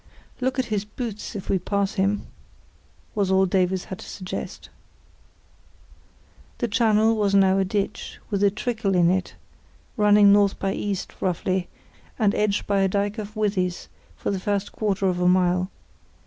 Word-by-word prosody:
"Look 260 Hz, +1 st, -1 dB
at 260 Hz, -, +1 dB
his 200 Hz, -2 st, 0 dB
boots 215 Hz, 0 st, -6 dB
if 195 Hz, -, -6 dB
we 190 Hz, -, +1 dB
pass 200 Hz, +3 st, -1 dB
him," 200 Hz, +1 st, 0 dB, 0.9 s
was 200 Hz, -3 st, 0 dB
all 190 Hz, 0 st, +4 dB
Davies 185 Hz, 0 st, +1 dB
had 190 Hz, -, -8 dB
to -, -, -10 dB
suggest. 185 Hz, -2 st, -7 dB, 1.9 s
The 240 Hz, -, -1 dB
channel 220 Hz, 0 st, +3 dB
was 205 Hz, -2 st, +1 dB
now 195 Hz, 0 st, +4 dB
a -, -, +3 dB
ditch, 195 Hz, +1 st, -3 dB
with 200 Hz, -1 st, 0 dB
a 200 Hz, -, +6 dB
trickle 215 Hz, -1 st, -2 dB
in 175 Hz, -1 st, +4 dB
it, 185 Hz, 0 st, -2 dB, 0.6 s
running 205 Hz, -1 st, +6 dB
north 200 Hz, -1 st, +3 dB
by 195 Hz, 0 st, -1 dB
east, 200 Hz, -2 st, -3 dB
roughly, 185 Hz, 0 st, -1 dB, 0.5 s
and 210 Hz, -3 st, +2 dB
edged 210 Hz, -1 st, 0 dB
by 200 Hz, -1 st, +1 dB
a 195 Hz, -, +3 dB
dyke 200 Hz, +3 st, -1 dB
of 215 Hz, +1 st, -7 dB
withies 195 Hz, -4 st, -1 dB, 0.3 s
for -, -, -2 dB
the 195 Hz, -, -2 dB
first 200 Hz, +1 st, -2 dB
quarter 200 Hz, -3 st, -1 dB
of 180 Hz, -2 st, +1 dB
a 180 Hz, -, +2 dB
mile. 180 Hz, 0 st, +2 dB
200 Hz, 160 wpm, -24 LUFS, 190-210 Hz, 1.9 s, a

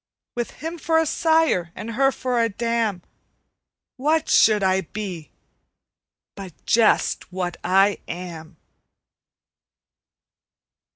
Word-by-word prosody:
With 240 Hz, -1 st, -3 dB, 0.2 s
him 330 Hz, +1 st, -5 dB
for 320 Hz, 0 st, +1 dB
a 325 Hz, -, +3 dB
sire 315 Hz, -, +1 dB
and 230 Hz, -, -6 dB
her 270 Hz, +4 st, +2 dB
for 250 Hz, -2 st, -1 dB
a 230 Hz, -, +1 dB
dam, 225 Hz, -3 st, -2 dB, 0.9 s
What 305 Hz, +4 st, 0 dB
should 215 Hz, -2 st, +4 dB
I 190 Hz, 0 st, +2 dB
be 180 Hz, -4 st, -7 dB, 1.0 s
but 190 Hz, -4 st, -9 dB
just 225 Hz, -4 st, +2 dB
what 180 Hz, -1 st, -4 dB
I 195 Hz, +2 st, +3 dB
am? 170 Hz, -2 st, -8 dB
215 Hz, 105 wpm, -22 LUFS, 185-255 Hz, 1.0 s, should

